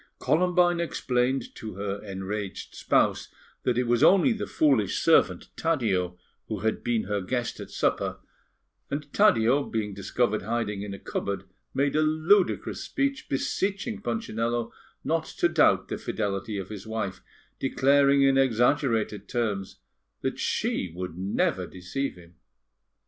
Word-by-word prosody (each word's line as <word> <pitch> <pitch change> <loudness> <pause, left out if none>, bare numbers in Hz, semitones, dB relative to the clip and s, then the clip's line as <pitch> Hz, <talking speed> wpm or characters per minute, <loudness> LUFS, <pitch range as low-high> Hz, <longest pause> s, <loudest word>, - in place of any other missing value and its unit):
Columbine 175 +1 +3
explained 130 -6 0
to 110 -4 -8
her 100 0 -4
enraged 100 0 -5
spouse - - +1 0.3
that 125 -2 0
it 125 - +3
was 120 0 +2
only 200 +6 +6
the 220 - -4
foolish 135 -10 +2
servant - - +3
Taddeo 100 - 0 0.3
who - - -4
had 110 +1 -1
been 120 -2 +1
her 100 +1 -2
guest 120 +5 -2
at - - -7
supper, - - 0 0.7
and 145 0 -5
Taddeo, 145 - +4
being 105 -5 -3
discovered 105 +3 0
hiding 110 -1 -2
in 100 -1 -5
a - - -8
cupboard, 100 0 -3 0.3
made 140 +2 +1
a 155 - +4
ludicrous 160 +6 +2
speech, 275 -1 -2
beseeching 200 - -1
Punchinello 120 - -2 0.3
not - - 0
to - - +4
doubt - - +3
the - - -3
fidelity 100 0 -3
of 95 -1 -5
his 105 0 -8
wife, 110 -4 -3 0.4
declaring 140 +1 +4
in 135 0 +4
exaggerated 120 -4 +1
terms 105 -6 -2 0.4
that - - -2
she 90 - -1
would 90 -2 -5
never 95 +3 0
deceive 95 +10 -4
him. 85 -1 -16
120 Hz, 140 wpm, -27 LUFS, 100-145 Hz, 0.7 s, only